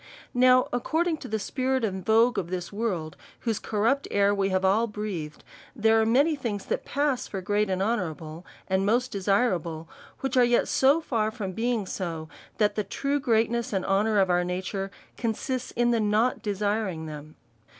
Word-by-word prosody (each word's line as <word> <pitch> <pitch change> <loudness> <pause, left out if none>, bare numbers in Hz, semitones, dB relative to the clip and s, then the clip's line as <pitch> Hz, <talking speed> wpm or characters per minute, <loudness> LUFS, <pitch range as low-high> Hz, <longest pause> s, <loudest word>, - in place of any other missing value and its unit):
Now 255 0 +5
according 320 +7 0
to - - -9
the 220 - -1
spirit 260 +3 -1
and 190 -3 -3
vogue 225 +4 +4
of 170 - -5
this 180 +1 -4
world, 190 -8 -2 0.3
whose 225 -3 -1
corrupt 230 +7 0
air 200 0 +3
we 195 -1 +1
have 190 0 +1
all 215 +5 +3
breathed, 200 -8 -5 0.3
there 225 -1 +4
are 220 - +1
many 280 +7 +3
things 225 -8 -4
that - - -2
pass 280 -2 0
for 195 - -4
great 205 +2 0
and 190 0 0
honourable, 165 -7 -3 0.2
and 190 0 +1
most 240 +5 +1
desirable, 185 -5 0 0.3
which 270 0 -2
yet 245 -1 +4
are - - -9
so 275 +5 +3
far 225 -8 0
from 215 -4 -5
being 230 +1 -1
so, 165 -4 -4 0.3
that 210 -1 +2
the 210 - -1
true 280 +7 -1
greatness 235 0 +1
and 190 -2 -1
honour 210 +2 +2
of 190 -2 +3
our 180 0 +3
nature 190 +2 -3 0.3
con 225 -2 0
sists 255 0 -4
in 240 0 +2
the 235 - +2
not 215 +3 +1
desiring 205 -5 -1
them. 155 0 -9
215 Hz, 180 wpm, -26 LUFS, 190-240 Hz, 0.3 s, Now